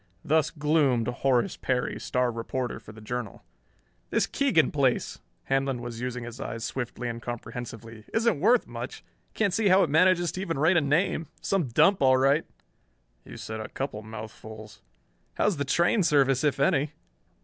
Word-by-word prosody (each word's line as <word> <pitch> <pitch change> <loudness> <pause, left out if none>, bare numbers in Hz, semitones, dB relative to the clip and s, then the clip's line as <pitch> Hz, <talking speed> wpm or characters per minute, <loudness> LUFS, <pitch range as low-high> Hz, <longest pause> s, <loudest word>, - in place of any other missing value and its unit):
Thus 155 0 +2
gloomed 150 -6 +1
Horace 125 0 +1
Perry, 125 -1 -1
star 125 -1 0
reporter 120 +1 -4
for 110 - -13
the 110 0 -13
Journal. 120 -1 -5 0.7
"This - - +2
Keegan 260 - +2
place" 135 -4 0 0.2
Handlon 135 -1 0
was 120 -1 -7
using 125 -1 -4
his 120 +1 -8
eyes 115 -4 -5
swiftly 125 -1 -4
and 115 0 -5
comprehensively 115 -2 -7
"isn't 225 -7 +1
worth 235 +8 +4
much. - - -7 0.3
Can't 200 -4 +1
see 215 +1 +2
how 190 +1 +6
it 160 - -1
manages 175 +1 +4
to 185 - -5
even 170 -6 -2
rate 160 +6 +3
a - - +4
name. 160 +3 +1
Some 195 -5 0
dump, 190 - +3
all 130 -1 +5
right!" 140 +4 +3 0.8
"You - - -10
said 110 0 -6
a 110 - -6
couple 135 -6 -4
mouthfuls." 110 -1 -10 0.5
"How's 205 -6 +1
the 140 - -1
train 170 +9 +2
service, 140 -5 +3
if 145 -2 +1
any?" 140 +2 +2
135 Hz, 165 wpm, -27 LUFS, 120-160 Hz, 0.8 s, how